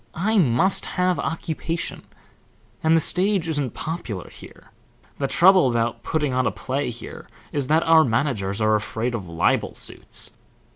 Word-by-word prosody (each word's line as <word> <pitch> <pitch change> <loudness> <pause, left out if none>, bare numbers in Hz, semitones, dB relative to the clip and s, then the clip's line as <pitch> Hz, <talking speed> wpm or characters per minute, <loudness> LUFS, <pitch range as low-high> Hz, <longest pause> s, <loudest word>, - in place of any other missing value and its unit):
I 210 +5 +2
must 165 +5 +3
have 180 0 +1
occupation, 165 0 -4 0.8
and 160 +1 +3
the - - +5
stage 185 +2 +2
isn't 145 -7 -2
popular 125 - -5
here. - - -15 0.5
The 135 - 0
trouble 180 -2 +5
about 115 -1 -1
putting 150 +1 -1
on 130 0 +1
a - - 0
play 135 0 -3
here 120 0 -9 0.2
is 140 -3 -2
that 160 +3 +3
our 160 -1 +6
managers 110 -6 -1
are 110 0 +3
afraid 110 +3 -2
of 100 -7 -5
libel 85 -1 0
suits. - - -2
145 Hz, 150 wpm, -23 LUFS, 115-165 Hz, 0.8 s, our